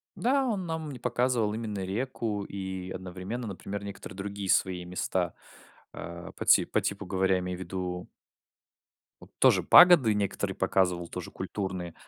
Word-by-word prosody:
Да, 270 +3 +2
он 200 -7 -2
нам 160 -2 -4
не 130 - -8
показывал 120 -2 +1
именно 110 -3 -4
реку 105 0 -2
и 95 -1 -5
одновременно, 95 +6 -5
например, 100 +1 -6
некоторые 100 -2 -8
другие 100 0 -5
свои 90 -2 +2
места. 90 0 -2 0.6
А 85 0 -8
по - - -7
ти - - +6
по - - 0
типу 100 0 -3
говоря, 95 0 +2
я 90 - +1
имею 90 0 -4
ввиду 90 0 -5 1.1
вот - - -14
тоже - - +5
пагоды 170 -11 +8
некоторые 100 -2 -1
показывал, 90 -2 +1
тоже - - -7
культурные. 95 -4 -4
100 Hz, 150 wpm, -28 LUFS, 90-115 Hz, 1.1 s, пагоды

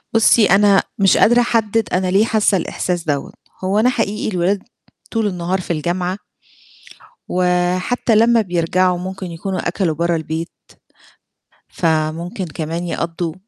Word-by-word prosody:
بُصي 225 0 +5
أنا 200 +1 +4 0.2
مش 195 -1 +4
قادرة 240 +2 +5
أحدد 225 -2 0
أنا 185 0 +1
ليه 205 +3 +4
حاسة 215 -3 +2
الإحساس 175 0 -3
دوّة، 145 -2 -2 0.3
هو 195 +3 +1
أنا 245 +3 +4
حقيقي 215 -3 -2
الولاد 185 +3 0 0.5
طول 225 -2 0
النهار 180 0 -2
في 170 - -3
الجامعة 180 +4 -2 1.1
وحتّى 180 +6 +1
لمّا 230 +1 +4
بيرجعوا 180 0 +1
ممكن 185 0 -6
يكونوا 185 +3 -4
أكلوا 175 -3 -1
برّه 170 +1 0
البيت، 160 +1 -4 1.2
فممكن 165 +3 -1
كمان 165 +2 -4
يقضّوا 170 -1 -3
185 Hz, 130 wpm, -18 LUFS, 170-205 Hz, 1.2 s, بُصي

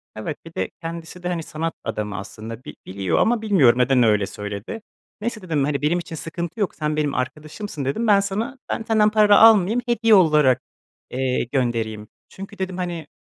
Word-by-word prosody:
Evet, 110 +7 -5
bir 165 - -11
de - - -2
kendisi 165 +2 -7
de, - - -2
hani, 170 -2 -2
sanat 165 0 -4
adamı 105 -2 -4
aslında 110 +4 -8
bi - - -9
biliyor 95 -3 -1
ama 235 -1 +2
bilmiyorum, 145 - +4
neden 125 0 +4
öyle 105 -3 +3
söyledi. 105 - -6 0.4
"Neyse" 225 0 -3
dedim, 160 -6 -1
"...hani, 145 -1 -1
benim 165 +4 +1
için 165 - -7
sıkıntı 170 +4 -6
yok, 205 - -1
sen 150 -1 -2
benim 150 -2 0
arkadaşımsın." 150 +4 -5
dedim, 220 - -1
"Ben 205 -2 +6
sana 210 +7 -3
ben 225 - -2
senden 215 -1 +3
para 210 -1 +5
almayayım, 225 +1 +6
hediye 230 -2 +4
olarak, 150 -8 +4 0.5
eee, 130 0 -1
göndereyim. 115 -5 -1 0.2
Çünkü" 195 +2 -10
dedim, 185 -1 -3
"...hani, 175 -4 -4
160 Hz, 180 wpm, -22 LUFS, 125-200 Hz, 0.5 s, Ben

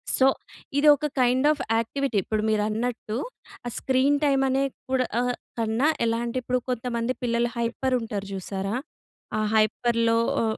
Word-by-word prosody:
So, 260 - +4 0.5
ఇది 300 +1 +4
ఒక 300 - -4 0.2
kind 255 +3 +3
of 305 - -2 0.2
activity. 260 +1 -1
ఇప్పుడు 215 -1 -1
మీరన్నట్టు, 215 +1 -1 0.5
ఆ 240 - -2
స్క్రీన్ 265 +2 +2
టైమ్ 275 -2 +3
అనే 270 +1 +2 0.3
కూడా 255 -1 +2
ఆహ్, 245 0 +1 0.3
కన్నా, 225 +6 +1 0.2
ఎలా 230 0 +1
అంటే, 235 +2 -3
ఇప్పుడు 255 +1 0
కొంతమంది 240 0 -1
పిల్లలు 235 0 +1
హైపరుంటారు 230 -3 -1
చూశారా? 195 +2 -3 0.6
ఆ - - 0 0.2
హైపర్‌లో 230 +1 +2 0.2
ఒ - - +1
240 Hz, 140 wpm, -25 LUFS, 225-260 Hz, 0.6 s, So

